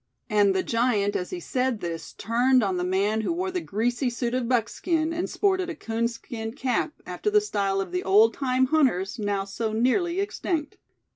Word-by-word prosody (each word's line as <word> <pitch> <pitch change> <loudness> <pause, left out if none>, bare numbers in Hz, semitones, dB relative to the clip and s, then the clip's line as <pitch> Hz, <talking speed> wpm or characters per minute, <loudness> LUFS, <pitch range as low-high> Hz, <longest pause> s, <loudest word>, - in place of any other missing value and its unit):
and 205 -2 +4
the 190 - +1
giant 230 -4 +1
as 180 - -2
he 365 - -5
said 255 -7 -1
this, 170 -3 -5
turned 245 +2 +2
on 190 -2 0
the 180 - -1
man 200 +4 +1
who 220 - -1
wore 365 +2 -2
the 360 -1 -2
greasy 240 +4 -1
suit 240 0 -3
of 250 -2 -1
buckskin, 315 - 0
and 345 +2 -2
sported 375 -3 +1
a 340 - -4
coonskin 230 -2 -3
cap, 260 +2 -1
after 420 - -2
the 420 0 +5
style 200 - -1
of 190 -2 -3
the 180 0 -1
old 210 +4 +5
time 260 -1 +1
hunters, 255 - +1
now 200 -2 -1
so 215 +3 -3
nearly 300 - +1
extinct. 340 -6 -2
235 Hz, 190 wpm, -26 LUFS, 205-300 Hz, -, the